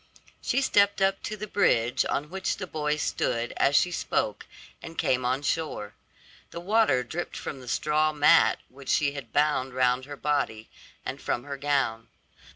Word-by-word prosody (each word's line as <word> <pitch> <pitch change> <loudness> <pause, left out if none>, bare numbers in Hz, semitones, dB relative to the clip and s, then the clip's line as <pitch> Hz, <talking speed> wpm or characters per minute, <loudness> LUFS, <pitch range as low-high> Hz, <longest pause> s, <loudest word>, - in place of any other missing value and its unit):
She 275 - +1
stepped 200 -6 +3
up 195 0 +2
to 215 - -5
the 210 - -5
bridge 120 - +2
on 150 +3 -2
which 190 0 -2
the 185 - -4
boy 150 -3 -1
stood 120 -5 -1
as 140 - +3
she 180 - +4
spoke, - - -2 0.3
and 165 - -10
came 130 0 +1
on 130 +3 0
shore. 145 -10 -2 0.6
The 170 - -7
water 190 - +2
dripped 165 +8 -5
from 140 - -6
the 125 - -12
straw 155 +4 +1
mat 150 +2 +5
which 135 +1 -12
she 145 -2 +2
had 140 -6 -8
bound 145 -3 +1
round 130 0 +2
her 145 0 -8
body, 140 -7 -1 0.3
and - - -5
from 120 - -2
her 140 -1 -5
gown. 135 -5 -1
145 Hz, 170 wpm, -27 LUFS, 130-170 Hz, 0.6 s, mat